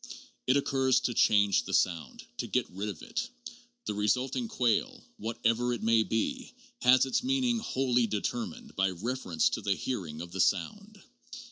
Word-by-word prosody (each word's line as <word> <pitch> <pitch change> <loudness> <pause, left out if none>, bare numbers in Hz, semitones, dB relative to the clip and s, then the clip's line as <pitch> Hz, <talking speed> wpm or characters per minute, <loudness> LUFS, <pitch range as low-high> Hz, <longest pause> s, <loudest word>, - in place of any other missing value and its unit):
It 130 +2 +4
occurs 135 -2 +2
to 120 - -1
change 100 -3 +4
the - - -1
sound, 80 -7 0
to - - -3
get - - 0
rid 100 +3 -4
of 95 -7 -8
it. 235 - -3 0.6
The - - -2
resulting 125 - 0
quale, 125 - 0
whatever 115 +2 0
it 120 - -5
may 115 0 +4
be, 255 - -2 0.3
has 130 +1 +6
its 130 - 0
meaning 255 -3 +1
wholly 125 - +1
determined 230 - -4
by 95 0 +2
reference 90 -3 -1
to - - -3
the 100 -1 0
hearing 90 -13 -4
of 85 0 -8
the 95 - -1
sound. 210 -1 -1
120 Hz, 160 wpm, -30 LUFS, 100-140 Hz, 0.6 s, has